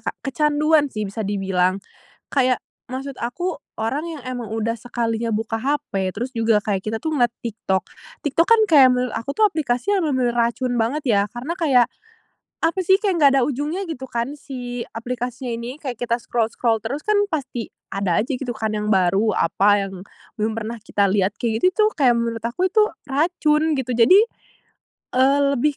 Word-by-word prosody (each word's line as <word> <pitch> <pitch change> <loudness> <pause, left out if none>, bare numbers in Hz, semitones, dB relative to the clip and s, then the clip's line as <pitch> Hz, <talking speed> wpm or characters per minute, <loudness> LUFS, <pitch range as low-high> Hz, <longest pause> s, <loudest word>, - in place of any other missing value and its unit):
Kak, - - -3
kecanduan 300 +2 +2
sih, 215 -4 -4
bisa 200 +2 -5
dibilang. 195 -2 0 0.5
Kayak, 255 -3 +2 0.2
maksud 265 +2 -6
aku, 350 +10 -3 0.2
orang 245 +8 -2
yang 315 -5 -7
emang 245 -3 -5
udah 225 +1 -1
sekalinya 230 -1 -2
buka 225 +1 -2
hape, 265 -8 -1
terus 245 +5 -3
juga, 225 -3 +2
kayak 200 -3 0
kita 215 +3 -3
tuh, 315 - -2
ngeliat 240 -6 +2
TikTok. 195 -5 -1 0.4
TikTok 310 +4 +2
kan, 460 -1 +6
kayak 280 -5 +8
menurut 250 0 -1
aku 235 +5 -4
tuh, 435 - +4
aplikasi 305 -1 -1
yang 400 - +2
bener-bener 255 -4 +1
racun 240 +2 0
banget, 270 +7 -1
ya. 210 -6 +3
Karena 245 - -5
kayak, 260 -7 +4 0.8
apa 330 +3 +1
sih, 375 +1 +4
kayak 395 -3 0
nggak 280 -3 +6
ada - - +2
ujungnya, 295 +7 -2
gitu 265 -5 -6
kan, 240 +4 -3
si 245 -3 -6
aplikasinya 245 +1 -4
ini. 235 +3 -6
Kayak 255 -6 -5
kita 235 -1 +1
scroll-scroll 230 0 0
terus, 275 +7 -4
kan, 425 - +1 0.2
pasti 260 -6 -3 0.2
ada 195 -4 0
aja 245 - -5
gitu, 250 -1 -4
kan, 220 -1 -2
yang 210 0 -2
baru, 195 +2 +2
apa, 200 +3 +3
yang 190 -1 -9 0.4
belum 215 +1 +1
pernah 225 +1 -4
kita 200 -2 +1
lihat. 195 +1 +1
Kayak 225 -1 -1
gitu 400 +4 +4
tuh, - - +1
kayak 255 -5 +4
menurut 230 -1 -3
aku 240 +11 0
itu 435 -1 +5 0.2
racun, 305 +1 +1
gitu. 260 -2 -2
Jadi, 245 - +7 1.0
eee, 270 +2 +4 0.2
lebih 290 +3 +1
245 Hz, 180 wpm, -22 LUFS, 225-290 Hz, 1.0 s, kayak